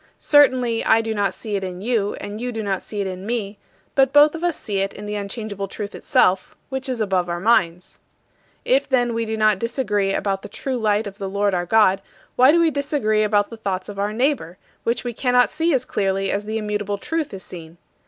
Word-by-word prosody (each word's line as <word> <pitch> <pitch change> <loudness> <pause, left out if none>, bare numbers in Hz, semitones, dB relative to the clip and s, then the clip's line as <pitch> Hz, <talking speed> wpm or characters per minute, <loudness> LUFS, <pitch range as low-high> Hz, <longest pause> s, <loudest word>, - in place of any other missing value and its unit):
Certainly, 255 -5 +3
I 225 - +4
do 225 0 -3
not 200 -3 0
see 215 -3 -5
it 195 - -2
in 180 -1 -5
you, 210 -1 0
and 205 +2 -7
you 250 0 -2
do 225 -2 -4
not 195 -2 -1
see 205 -2 -5
it - - -2
in 185 0 -5
me, 210 -2 -3 0.3
but 270 -1 +3
both 295 +1 +6
of 330 0 -6
us 350 -3 0
see 200 -3 -3
it 195 0 -1
in 210 - -9
the 210 - -4
unchangeable 205 -1 -4
truth 205 +1 -6
itself, 185 +1 +1
which 265 0 -4
is 250 -2 -2
above 190 -4 0
our 170 0 -2
minds." 180 -4 +1 0.7
If, - - +2
then, 245 -3 +2
we 230 0 -1
do 220 0 -3
not 215 -3 +3
disagree 210 -4 0
about 195 -1 -1
the - - -9
true 265 -2 -3
light 215 -1 +1
of 200 +1 -8
the 195 -1 -4
Lord 200 0 0
our 175 -1 -1
God, 195 -2 +4 0.3
why 255 +3 +6
do 340 - +4
we 330 -1 +3
disagree 280 -7 0
about 210 0 +1
the 230 - -8
thoughts 195 -3 -3
of 200 -1 -7
our 205 +1 0
neighbor, 240 - -1 0.3
which 235 +1 0
we 245 -1 -4
cannot 250 +1 +2
see 330 +1 0
as 260 -3 +1
clearly 195 -2 -1
as 205 +1 -2
the 220 +1 -2
immutable 210 -1 -2
Truth 320 +7 -3
is 190 -2 -8
seen? 165 -1 -10
215 Hz, 230 wpm, -22 LUFS, 195-245 Hz, 0.7 s, both